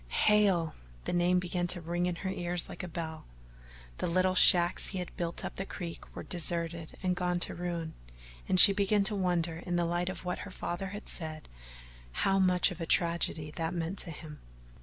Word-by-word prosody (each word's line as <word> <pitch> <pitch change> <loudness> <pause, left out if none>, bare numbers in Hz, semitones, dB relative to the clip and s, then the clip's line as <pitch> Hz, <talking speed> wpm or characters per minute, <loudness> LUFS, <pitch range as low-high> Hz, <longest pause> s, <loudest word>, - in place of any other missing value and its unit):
Hale! 190 - +3 0.3
the - - -3
name 175 +1 +3
began 180 0 -1
to 175 - +1
ring 175 +2 -2
in 180 - -2
her - - 0
ears 175 -2 -2
like - - -7
a 180 - -5
bell. 160 -1 -6 0.7
The - - -1
little 185 +2 +2
shacks 175 -1 +5
he 190 - -4
had 180 -1 -5
built 170 -1 -3
up - - -6
the 195 - -2
creek 170 -3 -8
were - - -6
deserted 170 -1 -2
and 180 -1 +1
gone 180 -1 -1
to - - +2
ruin, 170 -2 -4 0.6
and 185 - +3
she 200 - +11
began 200 +1 +2
to 205 +2 +4
wonder 175 -4 0
in 175 +1 -4
the 175 0 +1
light 175 +2 -1
of 185 - -7
what 180 - -3
her 205 - -7
father 185 0 -4
had 205 +3 -8
said 155 -2 -3 0.8
how 195 0 +3
much 180 0 +3
of 175 -1 -8
a 165 - -3
tragedy 170 -3 +1
that 165 +2 -2
meant 170 +3 -3
to - - -6
him. 155 -1 -9
175 Hz, 200 wpm, -30 LUFS, 170-185 Hz, 0.8 s, she